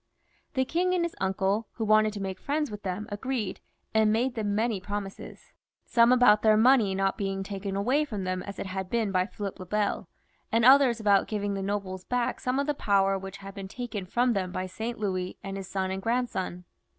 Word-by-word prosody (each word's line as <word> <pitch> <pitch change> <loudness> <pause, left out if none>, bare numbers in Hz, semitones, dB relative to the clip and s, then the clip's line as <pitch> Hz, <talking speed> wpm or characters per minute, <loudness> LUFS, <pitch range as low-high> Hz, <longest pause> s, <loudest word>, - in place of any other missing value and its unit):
The 260 0 +2
king 360 +6 +1
and 345 -1 +1
his 340 - -5
uncle, 195 +3 0
who 225 - -3
wanted 215 0 +4
to 205 - -5
make 190 -1 -4
friends 295 -1 -1
with 210 0 -7
them, 200 +2 -4
agreed, 215 -2 -3 0.3
and 220 -1 +4
made 240 +4 +1
them 210 -3 -1
many 220 -2 0
promises; 205 0 -7 0.3
some 235 0 +4
about 245 -4 +6
their 215 -1 +5
money 225 -4 +5
not 195 +2 0
being 195 -1 -2
taken 195 0 -5
away 250 +10 +2
from 215 -10 -4
them 185 0 -2
as 200 +1 -8
it - - -4
had 190 0 -4
been 225 -3 0
by 185 0 +1
Philip 200 -2 -6
le 185 - -7
Bel, 210 +2 -1 0.4
and 230 +1 +3
others 260 -3 +6
about 205 -2 +3
giving 205 -2 -2
the 195 - -3
nobles 195 -2 -3
back 245 +2 -1
some 255 +1 -1
of 280 - +1
the 295 - 0
power 195 -6 +2
which 195 0 -8
had 195 - -7
been 195 -1 -7
taken 210 -3 -5
from 245 +5 +2
them 185 -3 -2
by 185 0 -3
Saint 220 +6 -5
Louis 185 -3 -2
and 195 0 -5
his 195 -1 -6
son 190 0 -2
and 190 0 -3
grandson. 225 -6 -2
205 Hz, 215 wpm, -28 LUFS, 195-235 Hz, 0.4 s, about